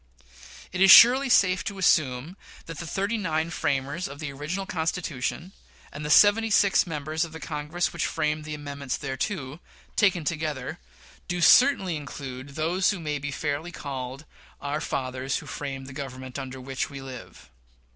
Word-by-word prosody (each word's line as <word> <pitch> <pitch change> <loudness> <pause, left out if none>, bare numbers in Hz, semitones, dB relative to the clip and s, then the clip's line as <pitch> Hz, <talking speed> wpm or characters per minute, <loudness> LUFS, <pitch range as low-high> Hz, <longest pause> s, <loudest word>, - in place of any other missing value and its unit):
It 185 - -3
is 195 - +7
surely 255 +7 +9
safe 185 -6 +4
to 200 -2 -4
assume 155 -3 +2 0.3
that 165 -2 -8
the 170 - -6
thirty 200 +6 -1
nine 160 -3 -1
framers 140 +4 -1
of 140 - -9
the 150 -1 -5
original 160 +8 -4
Constitution, 165 -1 -3 0.4
and 145 - -7
the 150 - -4
seventy 210 +6 +6
six 195 -2 +4
members 155 0 -2
of 165 -2 -7
the 160 - -7
Congress 155 +3 -3
which - - -1
framed 150 0 -1
the 155 0 -5
amendments 140 -2 -5
thereto, 140 +1 -4 0.4
taken 185 -5 +3
together, 155 -1 -3 0.5
do 175 0 -2
certainly 190 - +5
include 140 -1 -8
those 170 +5 +1
who 195 - -1
may 150 -3 -3
be 145 +1 -4
fairly 145 +4 -3
called 135 -2 -6 0.3
"our 145 +2 -3
fathers 130 -2 -2
who - - -8
framed 135 -2 -6
the 130 - -10
Government 130 -2 -7
under 130 -1 -7
which 130 +1 -4
we 140 - -8
live." 125 - -11
150 Hz, 165 wpm, -26 LUFS, 135-175 Hz, 0.5 s, surely